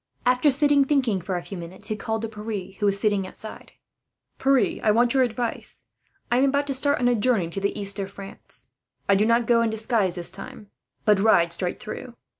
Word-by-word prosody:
After 250 +4 +4
sitting 285 +1 +4
thinking 260 -9 +1
for 185 +1 -3
a 175 - -5
few 195 - -7
minutes 185 +5 -9
he 215 - -1
called 220 +1 -3
to - - -1
Pierre, 215 -3 -6
who 205 - +2
was 200 0 +1
sitting 200 -2 +1
outside. 215 +3 -10 0.7
"Pierre, 270 -1 +2
I 220 - +2
want 235 +3 +3
your 265 - +3
advice. 240 -1 -1 0.5
I 240 - +3
am 265 - +4
about 280 +1 +1
to 280 - -2
start 285 +2 +1
on 245 - +2
a 245 - +4
journey 210 -7 +1
to 195 - -4
the 200 +1 -1
east 200 0 -2
of 195 0 -3
France. 195 0 -11 0.4
I 200 - +5
do 205 +2 +3
not 235 0 +3
go 235 0 +4
this 220 0 -3
time 230 -4 +2
in - - +1
disguise, 175 +4 -7 0.4
but 210 -2 +4
ride 170 -5 +4
straight 180 -2 -2
through. 245 +1 -8
220 Hz, 220 wpm, -24 LUFS, 200-250 Hz, 0.7 s, I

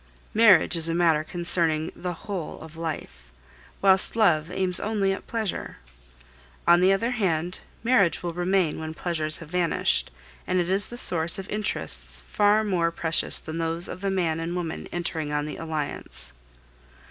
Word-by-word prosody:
Marriage 215 -5 +6
is 165 0 +3
a 165 - 0
matter 165 -3 +3
concerning 165 -2 +1
the 180 -1 -4
whole 190 -6 -5
of 160 0 -11
life, 150 - -6 0.6
whilst 190 +1 +5
love 170 -8 +3
aims 185 -1 0
only 200 -3 0
at 195 - -8
pleasure. 220 - -4 0.9
On 175 +1 +6
the 185 +1 +5
other 230 +5 +1
hand, 180 -6 -1 0.2
marriage 200 -11 +3
will 170 -1 -3
remain 180 -2 0
when 160 0 -6
pleasures 155 -3 -1
have 165 - -10
vanished, 175 -1 +1 0.4
and 185 0 +1
it 175 +1 0
is 195 +1 +3
the 240 - -7
source 170 -7 +2
of 195 0 -6
interests 210 0 -2
far 210 +1 +2
more 180 -5 +1
precious 165 -1 0
than 160 +1 -6
those 165 +1 0
of - - -7
the 200 - -1
man 170 -4 0
and 165 +2 -3
woman 170 -3 -4
entering 165 -3 -2
on 150 0 -1
the 150 - -6
alliance. 145 - -3
175 Hz, 165 wpm, -25 LUFS, 160-195 Hz, 0.9 s, Marriage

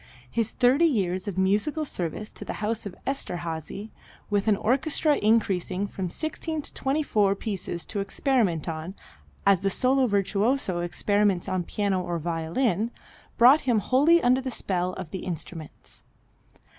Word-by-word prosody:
His 230 -2 0
thirty 265 +7 +4
years 190 - 0
of 195 -3 -4
musical 210 +12 +1
service 185 - -4
to - - -9
the - - -5
house 215 0 -2
of 185 - -9
Esterhazy, 180 - -4 0.4
with 205 +1 +1
an 215 - +5
orchestra 285 +6 +2
increasing 200 -3 +1
from 190 -2 -4
16 315 - -3
to - - -10
24 265 -8 +1
pieces 190 -5 -4
to 205 - -4
experiment 200 - 0
on, 165 +3 -5 0.5
as 200 -3 +5
the 195 - +1
solo 255 +5 +2
virtuoso 200 0 +1
experiments 200 +2 +1
on 185 -1 -1
piano 195 0 -1
or 175 -1 -3
violin, 175 - -1 0.5
brought 260 +6 +7
him 245 -4 +2
wholly 290 - +4
under 255 +2 +4
the 260 - -3
spell 185 -6 -2
of 185 -4 -7
the 190 - -4
instruments. 165 -2 -8
205 Hz, 145 wpm, -26 LUFS, 180-255 Hz, 0.5 s, brought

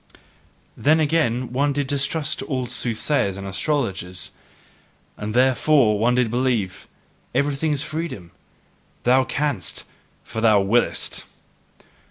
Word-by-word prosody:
Then 155 +3 +3
again 150 -6 +2
did 125 -1 -7
one 140 +2 +2
distrust 145 +2 -1
all 130 -4 -2
soothsayers 120 -3 -1
and 100 - -6
astrologers; 95 - -2 0.8
and 105 +1 -5
THEREFORE 130 -1 +4
did 105 - -2
one 120 +2 +3 0.2
believe, 120 -7 -1 0.5
"Everything 145 +2 +1
is 145 -1 -1
freedom: 150 - -5 0.7
thou 130 +2 +4
canst, 135 - -2 0.4
for 110 - -5
thou 110 -3 +5
willest!" 105 +5 0
130 Hz, 110 wpm, -22 LUFS, 110-145 Hz, 0.8 s, thou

